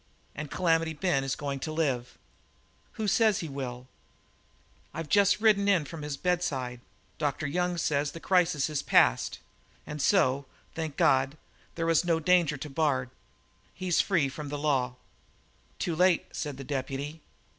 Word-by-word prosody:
And 155 Hz, -1 st, -6 dB
Calamity 165 Hz, -1 st, +1 dB
Ben 150 Hz, -4 st, 0 dB
is 135 Hz, 0 st, -1 dB
going 140 Hz, -1 st, -4 dB
to 155 Hz, -, -4 dB
live." 135 Hz, -6 st, -1 dB, 0.8 s
"Who 220 Hz, -, -3 dB
says 220 Hz, 0 st, +3 dB
he 165 Hz, -, -4 dB
will?" 130 Hz, -3 st, -6 dB, 1.1 s
"I've 160 Hz, -2 st, -5 dB
just 205 Hz, 0 st, +4 dB
ridden 210 Hz, -2 st, +4 dB
in 185 Hz, -7 st, +3 dB
from 160 Hz, +2 st, -8 dB
his 150 Hz, -1 st, -4 dB
bedside. 135 Hz, -9 st, -1 dB, 0.4 s
Dr. 145 Hz, 0 st, -1 dB
Young 180 Hz, +4 st, -1 dB
says 145 Hz, -3 st, 0 dB
the 165 Hz, -, -9 dB
crisis 180 Hz, -6 st, +2 dB
is 150 Hz, -2 st, -2 dB
past. -, -, +3 dB, 0.5 s
And 150 Hz, -1 st, -5 dB
so 140 Hz, -5 st, +2 dB, 0.3 s
thank 160 Hz, -3 st, -4 dB
God 135 Hz, +3 st, +3 dB, 0.4 s
there's 165 Hz, -1 st, +2 dB
no 170 Hz, -2 st, +1 dB
danger 165 Hz, -3 st, +3 dB
to 145 Hz, -, -6 dB
Bard; 135 Hz, -4 st, 0 dB, 0.6 s
he's 180 Hz, -2 st, +2 dB
free 170 Hz, -8 st, +1 dB
from 145 Hz, +2 st, -7 dB
the 145 Hz, -, -3 dB
law!" 135 Hz, -4 st, 0 dB, 0.8 s
"Too 170 Hz, -, -2 dB
late," 180 Hz, 0 st, +3 dB
said 145 Hz, -3 st, -4 dB
the 135 Hz, -, -7 dB
deputy. 140 Hz, +3 st, -4 dB
150 Hz, 150 wpm, -28 LUFS, 140-175 Hz, 1.1 s, just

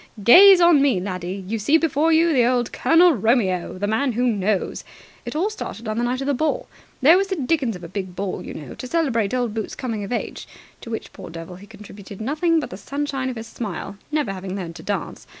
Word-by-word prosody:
Gaze 380 Hz, -, +9 dB
on 340 Hz, -4 st, +6 dB
me, 270 Hz, -9 st, +3 dB
laddie! 185 Hz, 0 st, -5 dB
You 225 Hz, +2 st, -2 dB
see 285 Hz, +10 st, +4 dB
before 320 Hz, 0 st, +1 dB
you 320 Hz, -5 st, +4 dB
old 245 Hz, -1 st, 0 dB
Colonel 340 Hz, +1 st, +5 dB
Romeo, 205 Hz, -7 st, 0 dB
the 200 Hz, -, -2 dB
Man 230 Hz, +5 st, 0 dB
who 245 Hz, +3 st, 0 dB
Knows! 205 Hz, -4 st, -1 dB, 0.4 s
It -, -, -5 dB
all 375 Hz, +7 st, 0 dB
started 235 Hz, -, -7 dB
on 215 Hz, +1 st, -2 dB
the -, -, 0 dB
night 250 Hz, +2 st, -1 dB
of -, -, -3 dB
the 285 Hz, -, +1 dB
ball. 315 Hz, -, -1 dB, 0.4 s
There 320 Hz, +6 st, +7 dB
was 390 Hz, +1 st, +1 dB
the 380 Hz, -, -2 dB
dickens 270 Hz, -, 0 dB
of 180 Hz, -, -11 dB
a -, -, -6 dB
big 185 Hz, 0 st, -6 dB
ball, 195 Hz, 0 st, -4 dB
you -, -, -8 dB
know, 145 Hz, -5 st, -8 dB
to 255 Hz, -, -8 dB
celebrate 250 Hz, -10 st, 0 dB
old 245 Hz, -4 st, -1 dB
Boots' 220 Hz, -2 st, -4 dB
coming 225 Hz, -5 st, -4 dB
of 200 Hz, -, -7 dB
age 240 Hz, -, -4 dB, 0.3 s
to -, -, -9 dB
which, 225 Hz, -, -6 dB
poor -, -, -10 dB
devil, 165 Hz, +2 st, -9 dB
he 200 Hz, +2 st, -14 dB
contributed 200 Hz, -2 st, -12 dB
nothing 310 Hz, +8 st, +1 dB
but -, -, -6 dB
the 185 Hz, -, -7 dB
sunshine 275 Hz, +3 st, -3 dB
of 255 Hz, -, -5 dB
his 225 Hz, 0 st, -7 dB
smile, 205 Hz, -4 st, -6 dB, 0.2 s
never 295 Hz, -10 st, -1 dB
having 190 Hz, 0 st, -6 dB
learned 175 Hz, -4 st, -6 dB
to -, -, -10 dB
dance. 195 Hz, -2 st, -5 dB
235 Hz, 230 wpm, -22 LUFS, 195-290 Hz, 0.4 s, Gaze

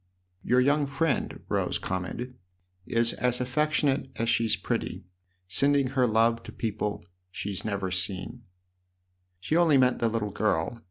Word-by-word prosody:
" 90 Hz, 0 st, -43 dB
II -, -, -11 dB
"YOUR 125 Hz, +1 st, +5 dB
young 145 Hz, +2 st, +2 dB
friend," 140 Hz, -1 st, -1 dB
Rose -, -, 0 dB
commented, 95 Hz, +7 st, -4 dB, 0.5 s
"is 115 Hz, 0 st, +2 dB
as 125 Hz, -1 st, 0 dB
affectionate 140 Hz, +1 st, +1 dB
as 115 Hz, 0 st, -1 dB
she's 115 Hz, -1 st, +2 dB
pretty: -, -, -3 dB, 0.4 s
sending 140 Hz, +7 st, +2 dB
her 130 Hz, -2 st, +2 dB
love 115 Hz, +1 st, +3 dB
to -, -, -10 dB
people 105 Hz, -2 st, -3 dB, 0.2 s
she 95 Hz, +3 st, -5 dB
has 100 Hz, -, -1 dB
never 100 Hz, -3 st, -2 dB
seen! 95 Hz, +6 st, -3 dB, 0.3 s
" 90 Hz, 0 st, -48 dB
" 90 Hz, 0 st, -46 dB
She 155 Hz, -, -1 dB
only 165 Hz, -4 st, +5 dB
meant 125 Hz, -1 st, +3 dB
the 115 Hz, -, +2 dB
little 110 Hz, -2 st, -2 dB
girl. 105 Hz, +1 st, 0 dB
115 Hz, 165 wpm, -27 LUFS, 95-130 Hz, 0.5 s, YOUR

